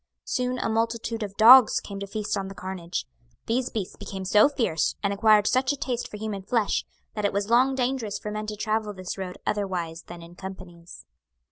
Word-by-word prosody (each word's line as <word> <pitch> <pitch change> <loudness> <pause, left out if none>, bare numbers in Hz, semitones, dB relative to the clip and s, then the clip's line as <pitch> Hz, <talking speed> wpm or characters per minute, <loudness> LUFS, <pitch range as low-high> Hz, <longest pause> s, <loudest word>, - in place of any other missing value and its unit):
Soon 250 0 -1
a - - -1
multitude 230 0 -1
of 200 -2 -5
dogs 240 +2 +8
came 200 -1 -8
to 200 - -5
feast 210 +1 -3
on 195 -1 -3
the 195 - -9
carnage. 180 - -5 0.4
These 245 +2 0
beasts 205 -5 -4
became 195 -1 -7
so 210 +8 +5
fierce, 225 - 0
and 200 0 +1
acquired 210 0 +4
such 255 +3 +2
a 285 - -3
taste 245 -3 -3
for 210 - -8
human 210 -2 -4
flesh, 210 +2 0 0.3
that 210 - -4
it 205 - +2
was 200 +2 -2
long 260 +3 +4
dangerous 245 -5 -1
for 210 - -6
men 215 0 -4
to 215 - -4
travel 215 0 -1
this 185 -2 -6
road 185 -1 -5
otherwise 180 -5 -2
than 175 -1 -9
in 170 +1 -13
companies. 180 -2 -10
210 Hz, 205 wpm, -26 LUFS, 190-230 Hz, 0.4 s, dogs